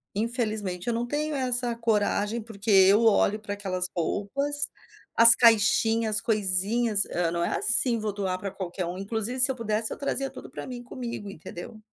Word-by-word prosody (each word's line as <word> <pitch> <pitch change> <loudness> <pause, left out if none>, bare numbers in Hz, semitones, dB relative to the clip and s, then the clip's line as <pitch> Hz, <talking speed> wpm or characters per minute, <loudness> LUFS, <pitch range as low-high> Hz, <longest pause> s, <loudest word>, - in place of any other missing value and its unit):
infelizmente 215 -4 -4
eu 235 - -1
não 235 +1 -3
tenho 300 +3 -4
essa 245 -2 0
coragem, 220 0 -2
porque 215 -1 -6
eu 195 +2 +4
olho 215 -1 +1
para 205 -1 -7
aquelas 185 -3 -4
roupas, 275 - -2 0.4
as 230 0 +9
caixinhas, 225 -1 +2
as - - -2
coisinhas, 210 +1 0
hã 170 -1 -3
não 170 0 -3
é - - -3
assim, 230 +2 +7
vou 215 -1 -5
doar 190 -2 -4
para 195 - -6
qualquer 185 -1 -7
um, 175 +2 -7
inclusive 220 +5 -5
se 255 - +6
eu - - -6
pudesse 220 -2 -1
eu - - -7
trazia 275 -1 -3
tudo - - -13
para - - -9
mim 250 -2 -9
comigo, 240 -4 -8
entendeu?" 185 +4 -12
220 Hz, 180 wpm, -24 LUFS, 200-235 Hz, 0.4 s, as